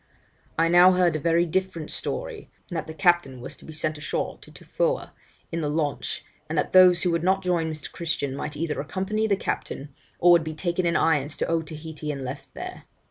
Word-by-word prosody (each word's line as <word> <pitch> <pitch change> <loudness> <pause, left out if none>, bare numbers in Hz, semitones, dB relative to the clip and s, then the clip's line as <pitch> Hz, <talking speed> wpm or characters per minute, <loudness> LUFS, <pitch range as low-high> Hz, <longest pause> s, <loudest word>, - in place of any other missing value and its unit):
I 165 +1 +4
now 175 +2 +7
heard 180 -3 +3
a - - 0
very 170 +3 +3
different 175 -2 -2
story, - - -5 0.2
and 175 - -7
that 160 - -3
the 160 - -6
captain 160 -5 +2
was 120 - -7
to - - -15
be - - -9
sent 155 0 -2
ashore 155 - -3
to - - -14
Tofoa - - -2 0.4
in 165 0 -2
the 150 - -1
launch, 150 -1 -2 0.2
and 160 - -2
that - - 0
those 185 -1 +7
who 180 - +2
would 170 -1 +1
not 190 +1 +2
join 170 -3 +1
Mr. 155 -1 -7
Christian 160 -5 -2
might 150 +2 -4
either 155 -2 -1
accompany 195 +8 -1
the 200 - +3
captain, 140 -6 -4 0.2
or 175 - +6
would 170 -2 +6
be 155 0 -5
taken 175 +2 0
in 170 - +1
irons 150 -2 +2
to - - -1
Otaheite 160 -1 -3
and 150 -3 -3
left 130 +2 -7
there. - - -7
165 Hz, 210 wpm, -25 LUFS, 150-180 Hz, 0.4 s, now